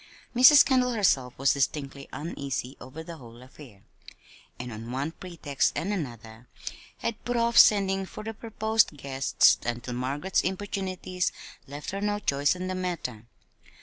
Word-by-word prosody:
Mrs. 255 +4 +9
Kendall 255 -2 +2
herself 135 - +1
was 135 0 +3
distinctly 140 0 -2
uneasy 140 -4 -4
over 145 +6 -9
the 165 0 -9
whole 120 -2 -13
affair; 130 -6 -15 0.7
and 125 0 -6
on 115 +2 -7
one 135 +5 -2
pretext 165 -6 -2
and 195 +5 -1
another 120 - -7 0.5
had 230 -1 -4
put 245 0 -1
off 235 0 +1
sending 195 -3 +5
for 215 - -9
the 225 +1 -5
proposed 220 -5 0
guests 135 -2 +3
until 120 +1 -4
Margaret's 140 +9 -1
importunities 185 -1 -3 0.4
left 145 +2 -7
her 195 +1 -4
no 205 0 0
choice 145 -6 +1
in 180 0 -5
the 185 - -2
matter. 170 -12 -4
160 Hz, 150 wpm, -27 LUFS, 130-195 Hz, 0.7 s, Mrs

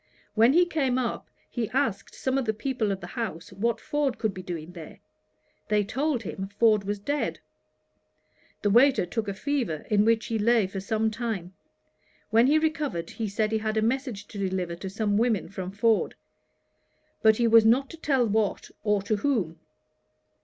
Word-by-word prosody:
When 230 +4 +5
he 350 +2 +5
came 275 -7 0
up, 250 -2 -3 0.2
he 235 -4 -3
asked 225 -7 -1
some 260 0 -1
of 265 - -2
the 220 -1 0
people 230 -3 -1
of 195 0 -3
the - - -6
house 190 -9 -5
what 225 +4 0
Ford 290 -4 -1
could 220 -4 -1
be 185 - -7
doing 175 -2 -6
there. 170 -3 -10 0.7
They 210 -1 +2
told 265 +3 -1
him 190 0 -5
Ford 210 0 +3
was 205 +1 -2
dead. 285 +9 -2 1.2
The 205 - +2
waiter 250 -1 +5
took 215 +4 -3
a 200 - -2
fever, 240 - -2
in 205 -1 +4
which 225 -1 +2
he 225 +1 -2
lay 230 0 +3
for 195 +1 -5
some 220 +2 0
time. 215 -6 -4 0.8
When 230 +3 +5
he 300 +3 +5
recovered, 300 - -1
he 225 - -3
said 215 +2 -1
he 220 - +1
had 215 0 -2
a 215 - +2
message 235 -3 -1
to 205 - -8
deliver 185 -3 -2
to 190 +2 -6
some 205 +1 0
women 230 -4 +1
from 185 -2 -5
Ford; 215 +3 +1 1.1
but 220 -1 +5
he 240 - +2
was 230 0 +7
not 245 +5 +4
to 330 - -10
tell 270 -6 +2
what, 215 -1 -1
or 210 -2 +1
to 215 +1 0
whom. 205 - -1
220 Hz, 185 wpm, -27 LUFS, 200-245 Hz, 1.2 s, was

